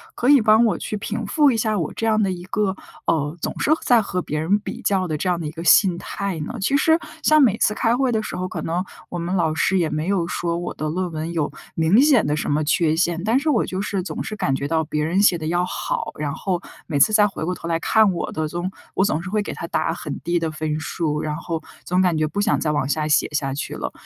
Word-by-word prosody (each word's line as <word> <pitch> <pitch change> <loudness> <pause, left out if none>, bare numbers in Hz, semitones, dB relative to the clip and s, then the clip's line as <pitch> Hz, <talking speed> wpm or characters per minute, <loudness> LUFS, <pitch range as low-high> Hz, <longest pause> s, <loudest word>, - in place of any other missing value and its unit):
可 245 - -1
以 285 -2 +8
帮 215 +2 +5
我 220 - +1
去 215 - -4
平 220 +2 -4
复 295 +6 +3
一 - - 0
下 215 -1 0
我 160 - -2
这 225 - -3
样 220 -1 +3
的 195 - +1
一 175 -1 -6
个， 200 -1 -1 0.3
呃， 150 0 0
总 - - -3
是 300 - +1
在 240 -2 +5
和 185 -3 -2
别 150 -1 -3
人 185 +7 +2
比 210 - -7
较 190 -2 +1
的 155 -2 -2
这 185 - -3
样 175 -1 0
的 165 - -5
一 - - -5
个 165 +1 -7
心 180 -1 +5
态 195 -3 -4
呢？ 155 - -5
其 275 +8 +1
实 320 +3 +4 0.3
像 310 -1 +5
每 220 -5 +4
次 210 - +2
开 230 +1 +1
会 260 -2 +1
的 220 - +1
时 215 - -5
候， 185 0 -2
可 165 - -5
能 170 +4 -1 0.3
我 175 - -5
们 175 +2 -3
老 160 -3 +1
师 190 +3 +2
也 165 -3 +1
没 155 +2 -2
有 190 -4 +1
说 170 -1 -2
我 175 +1 -4
的 155 - -3
论 180 +3 -2
文 160 +1 -4
有 155 -3 0 0.3
明 165 +9 +4
显 280 -6 +4
的 145 +1 +1
什 150 - -2
么 150 +1 +1
缺 155 +1 +2
陷， 170 0 0
但 225 +5 +2
是 305 +2 -1
我 245 - +2
就 185 +1 -3
是 200 -2 -2
总 - - -5
是 215 - -5
感 135 - 0
觉 140 - -3
到 160 +1 +1
别 150 0 -2
人 180 +5 +1
写 190 -4 +4
得 155 -1 -5
要 175 +2 +1
好， - - -3
然 145 -1 -2
后 180 +1 -2 0.3
每 145 -4 -1
次 215 - +5
再 210 -1 +6
回 190 - -5
过 180 - -1
头 - - -8
来 165 - +1
看 215 +3 +4
我 170 - -3
的 155 - -1
总 175 +3 -3 0.3
我 190 - +3
总 165 -6 0
是 190 - -6
会 210 +1 0
给 - - -5
他 170 - -6
打 170 - 0
很 150 -4 -6
低 175 0 0
的 165 -1 -1
分 155 0 -3
数， 155 -1 -2
然 150 -1 -2
后 165 -1 -4 0.2
总 180 +1 +1
感 180 -3 +2
觉 155 0 +1
不 205 +6 -2
想 215 - +2
再 155 - 0
往 145 -3 0
下 155 +1 0
写 155 0 +3
下 140 -2 -1
去 140 - -4
了。 - - -4
175 Hz, 300 characters per minute, -22 LUFS, 160-210 Hz, 0.3 s, 以